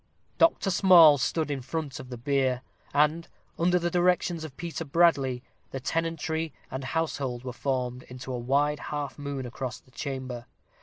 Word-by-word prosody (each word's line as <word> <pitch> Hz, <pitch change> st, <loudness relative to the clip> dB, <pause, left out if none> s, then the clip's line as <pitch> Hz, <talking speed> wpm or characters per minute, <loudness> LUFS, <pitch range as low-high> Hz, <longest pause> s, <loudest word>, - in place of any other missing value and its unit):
Dr. 320 Hz, -11 st, +4 dB
Small 170 Hz, -6 st, +7 dB
stood 155 Hz, +3 st, 0 dB
in 140 Hz, -2 st, -2 dB
front 140 Hz, +2 st, -4 dB
of 130 Hz, -1 st, -9 dB
the 125 Hz, -, -6 dB
bier; 130 Hz, 0 st, 0 dB, 0.3 s
and, 150 Hz, +3 st, +2 dB, 0.3 s
under 175 Hz, +2 st, +3 dB
the 175 Hz, 0 st, -1 dB
directions 175 Hz, -1 st, +2 dB
of 145 Hz, -4 st, -9 dB
Peter 170 Hz, -1 st, -4 dB
Bradley, 140 Hz, -5 st, +2 dB, 0.3 s
the 135 Hz, -, -5 dB
tenantry 165 Hz, +2 st, -2 dB, 0.2 s
and 130 Hz, +1 st, -4 dB
household 135 Hz, -4 st, -2 dB
were 125 Hz, -1 st, -5 dB
formed 125 Hz, -1 st, -2 dB
into 125 Hz, +1 st, -7 dB
a 125 Hz, -, -3 dB
wide 145 Hz, +4 st, +1 dB
half 145 Hz, -2 st, -5 dB
moon 140 Hz, -2 st, -4 dB
across 125 Hz, +1 st, -5 dB
the 130 Hz, -, -26 dB
chamber. 130 Hz, -3 st, -5 dB
140 Hz, 160 wpm, -28 LUFS, 130-165 Hz, 0.3 s, Small